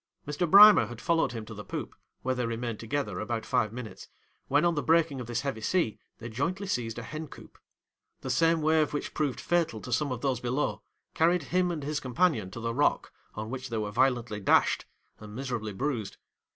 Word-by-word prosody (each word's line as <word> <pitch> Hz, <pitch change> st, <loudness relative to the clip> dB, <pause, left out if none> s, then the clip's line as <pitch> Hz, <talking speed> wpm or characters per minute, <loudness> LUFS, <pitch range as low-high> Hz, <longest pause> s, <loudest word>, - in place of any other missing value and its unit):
'Mr. 150 Hz, +4 st, -1 dB
Brimer 210 Hz, +3 st, +9 dB
had 120 Hz, -1 st, -9 dB
followed 165 Hz, +1 st, +1 dB
him 115 Hz, -2 st, -6 dB
to 110 Hz, -, -9 dB
the 105 Hz, -1 st, -8 dB
poop, -, -, -6 dB, 0.3 s
where 130 Hz, -, +1 dB
they 125 Hz, -2 st, -2 dB
remained 115 Hz, -1 st, -3 dB
together 115 Hz, -5 st, -3 dB
about 110 Hz, +1 st, -3 dB
five 120 Hz, -5 st, +1 dB
minutes, 115 Hz, -4 st, -8 dB, 0.4 s
when 145 Hz, +4 st, +3 dB
on 170 Hz, -, +3 dB
the 150 Hz, -, -1 dB
breaking 160 Hz, -4 st, +2 dB
of 120 Hz, -, -7 dB
this 120 Hz, 0 st, -2 dB
heavy 135 Hz, -6 st, -3 dB
sea, 165 Hz, -, 0 dB, 0.2 s
they 115 Hz, -, -8 dB
jointly 165 Hz, -, -2 dB
seized 120 Hz, -, -2 dB
a 115 Hz, -, -5 dB
hen 155 Hz, +4 st, -6 dB
coop. -, -, -14 dB, 0.6 s
The -, -, -3 dB
same 165 Hz, -1 st, +3 dB
wave 155 Hz, -1 st, +2 dB
which 145 Hz, -, -4 dB
proved 145 Hz, -4 st, -1 dB
fatal 170 Hz, -10 st, 0 dB
to 125 Hz, -, -5 dB
some 145 Hz, +2 st, 0 dB
of 125 Hz, -2 st, -4 dB
those 135 Hz, -4 st, 0 dB
below, 125 Hz, +4 st, -1 dB, 0.3 s
carried 170 Hz, +1 st, +2 dB
him 180 Hz, +4 st, +1 dB
and 160 Hz, -4 st, -3 dB
his 150 Hz, +1 st, -2 dB
companion 125 Hz, -, +1 dB
to 115 Hz, -, -8 dB
the 115 Hz, 0 st, -2 dB
rock, 145 Hz, +4 st, +1 dB, 0.2 s
on 110 Hz, +2 st, -5 dB
which 130 Hz, 0 st, -5 dB
they 115 Hz, -, -2 dB
were 105 Hz, -1 st, -2 dB
violently 120 Hz, -2 st, +1 dB
dashed 100 Hz, -, +3 dB, 0.3 s
and 105 Hz, 0 st, -10 dB
miserably 120 Hz, -5 st, -3 dB
bruised. 115 Hz, -1 st, -3 dB
130 Hz, 205 wpm, -28 LUFS, 115-155 Hz, 0.6 s, Brimer